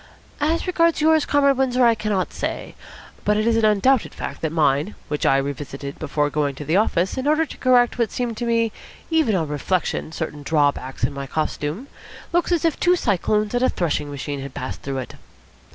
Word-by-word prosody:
"As 315 +3 0
regards 335 -3 +2
yours, 315 0 +3
Comrade 280 -2 +3
Windsor, 255 -2 +3
I 235 - +6
cannot 210 -4 -2
say. - - -4 0.5
But 210 0 +2
it 215 - +1
is 230 -1 +3
an 225 -1 +3
undoubted 215 +4 +2
fact - - -6
that 160 - -1
mine, 150 +3 +1
which 150 0 0
I 135 - +4
revisited 140 0 -5
before 145 -1 -1
going 145 -2 0
to 150 - -7
the 160 - +1
office, 190 +1 +1
in 260 - -2
order 310 +2 +3
to - - -11
correct 245 -1 +3
what 235 - +2
seemed 240 -2 -2
to 240 - -3
me 230 -1 +2 0.4
even 315 -10 +3
on 165 -4 0
reflection 155 +3 -1
certain 155 -3 -5
drawbacks 145 -3 0
to 125 - +2
my 140 -1 -6
costume, 155 - -3 0.5
looks 345 +1 +1
as 340 -2 +2
if 325 - +1
two 360 0 +4
cyclones 210 - 0
and 245 - +1
a 255 - +4
threshing 155 -4 -1
machine 145 0 -5
had 135 -1 -8
passed 130 - -5
through 135 -1 -4
it." 130 - -5
200 Hz, 200 wpm, -22 LUFS, -, 0.5 s, I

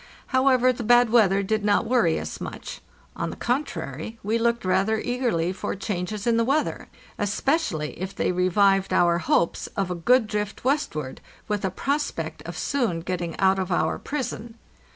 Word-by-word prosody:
However, 260 -1 +4
the 240 - -6
bad 240 0 +5
weather 200 -4 +4
did 215 +2 -1
not 205 +1 +2
worry 220 -9 +2
us - - -6
much; - - -7 0.3
on - - -3
the - - -6
contrary, 225 - -3
we 220 +3 0
looked 235 -2 0
rather 195 +4 +2
eagerly 235 -10 -1
for 190 - -4
changes 200 +1 -4
in 235 -1 +3
the 230 - +3
weather, 275 +6 0 0.3
especially 205 - 0
if 190 +1 -4
they - - 0
revived 195 +2 +2
our 170 -1 +3
hopes 170 0 +1
of 195 -2 0
a - - +1
good 225 +8 +3
drift 210 -1 -4
westward, 240 - -1 0.3
with 210 -2 -2
a 190 - +1
prospect 280 - -2
of - - -6
soon 235 - -1
getting 175 -1 -4
out 190 0 +3
of 185 0 -2
our 160 -2 +1
prison. 240 -5 -5
205 Hz, 170 wpm, -25 LUFS, 180-240 Hz, 0.3 s, bad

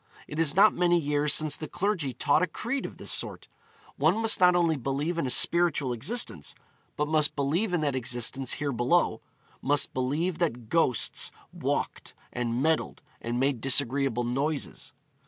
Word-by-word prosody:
It 150 - -6
is 160 -3 +2
not 205 +3 +6
many 175 -1 +2
years 145 -1 0
since 155 -1 +4
the 155 - -6
clergy 185 -8 -2
taught 140 +6 +1
a 180 - +2
creed 240 +10 -4
of - - -13
this - - -5
sort. - - -2 0.5
One - - +2
must 225 0 +3
not 180 -1 +5
only 170 -2 +2
believe 145 +6 -2
in 140 - -1
a - - -2
spiritual 155 -3 +3
existence, 120 - -2 0.4
but 150 - 0
must 155 -1 +1
believe 160 +9 0
in 175 -3 0
that 145 -3 -1
existence 130 +1 -1
here 145 -1 -3
below 125 +8 +1 0.4
must 145 +2 +1
believe 150 +7 -2
that 125 -10 -2
ghosts 165 -8 +1 0.2
walked, - - -3 0.2
and 120 +1 -2
meddled, 160 0 -1 0.2
and 120 +1 -3
made 135 -3 0
disagreeable 135 -1 +2
noises. 135 +5 -3
145 Hz, 165 wpm, -27 LUFS, 130-170 Hz, 0.5 s, not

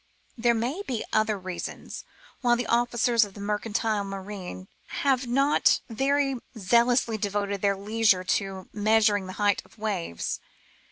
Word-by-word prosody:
There 235 0 +2
may 250 - -2
be 255 - -3
other 215 -1 +2
reasons 185 -2 -6 0.4
why 240 -2 +4
the 240 0 -2
officers 240 0 +3
of 200 -2 -7
the - - -10
mercantile 210 +1 -1
marine 195 - -7 0.2
have 265 -2 0
not 275 +4 +3
very 275 +2 +1 0.2
zealously 235 +2 +3
devoted 200 -1 -1
their 200 -1 +2
leisure 205 -2 +2
to 190 0 -2
measuring 210 -2 +3
the 185 - -6
height 205 -1 +1
of - - -22
waves. 200 - -3
215 Hz, 135 wpm, -27 LUFS, 200-240 Hz, 0.4 s, why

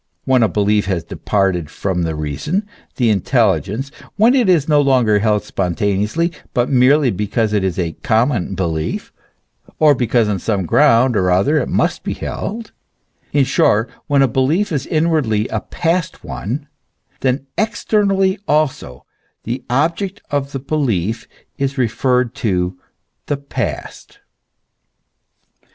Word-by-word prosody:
When 130 -2 +3
a 110 - +3
belief 105 +1 +1
has 90 -4 -1
departed 90 -3 -1
from 95 -3 -2
the 80 -2 -2
reason, 75 - -2 0.3
the 120 -4 +2
intelligence, 105 - 0 0.3
when 225 +4 +5
it 250 -7 +3
is 165 -6 +3
no 150 -2 +4
longer 125 -7 +3
held 105 -1 +1
spontaneously, 100 - -1 0.2
but 120 +1 +1
merely 130 +1 +4
because 105 +2 -1
it 105 -2 +1
is 95 -2 -1
a 85 -3 -1
common 115 -6 +1
belief, 80 -4 -3 0.6
or 155 -2 +5
because 120 -3 +1
on 100 -2 -1
some 100 -1 -1
ground 125 - +4
or 95 -3 +2
other 100 +13 +3
it 130 - -2
must - - 0
be - - -4
held; 225 +1 -5 0.6
in 145 -2 +3
short, 115 -3 +2 0.2
when 140 -2 +3
a - - +4
belief 140 - +1
is 140 -3 -2
inwardly 155 -10 +1
a - - -1
past 170 0 -2
one; 135 - -5 0.5
then 135 +1 0
externally 195 -3 +1
also 145 - -1 0.4
the 120 +3 -4
object 170 +9 0
of 140 -1 -1
the 135 - -3
belief 115 - -1 0.3
is 140 +1 -1
referred 125 0 +1
to 90 -4 -1 0.5
the 145 - -1
past. 140 0 -5
125 Hz, 140 wpm, -18 LUFS, 100-145 Hz, 0.6 s, when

